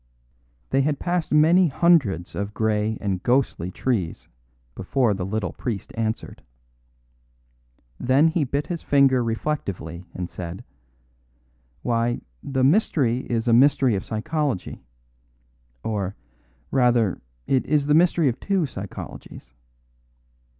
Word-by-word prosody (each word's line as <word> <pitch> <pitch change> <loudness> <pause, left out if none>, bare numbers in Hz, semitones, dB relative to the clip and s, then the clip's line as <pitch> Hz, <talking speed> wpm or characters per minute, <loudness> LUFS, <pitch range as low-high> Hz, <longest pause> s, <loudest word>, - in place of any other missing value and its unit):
They 135 - +3
had 145 +1 0
passed 175 0 -2
many 165 +4 +5
hundreds 135 - +2
of 100 +1 -4
grey 110 0 0
and 95 -3 -2
ghostly 120 -9 +1
trees 95 -4 -2 0.5
before 115 - +1
the 95 -1 -4
little 100 -4 -2
priest 110 -6 -5
answered. 110 -1 -3 1.6
Then 135 +6 +4
he 160 -1 0
bit 140 +2 -2
his 170 -2 -4
finger 135 -3 +3
reflectively 100 - -3
and 90 -1 -3
said: 90 0 -7 1.2
"Why, 120 0 0 0.2
the 135 -2 -1
mystery 135 - +2
is 115 0 -1
a 115 - +4
mystery 135 0 +5
of 95 - -2
psychology. 130 - -3 1.0
Or, 100 -3 -2 0.6
rather, 120 -6 +2 0.2
it 130 -2 +2
is 145 -1 +2
a 150 - +3
mystery 170 -1 +4
of 125 - -1
two 195 -3 0
psychologies. 95 - -9
120 Hz, 115 wpm, -24 LUFS, 105-145 Hz, 1.6 s, many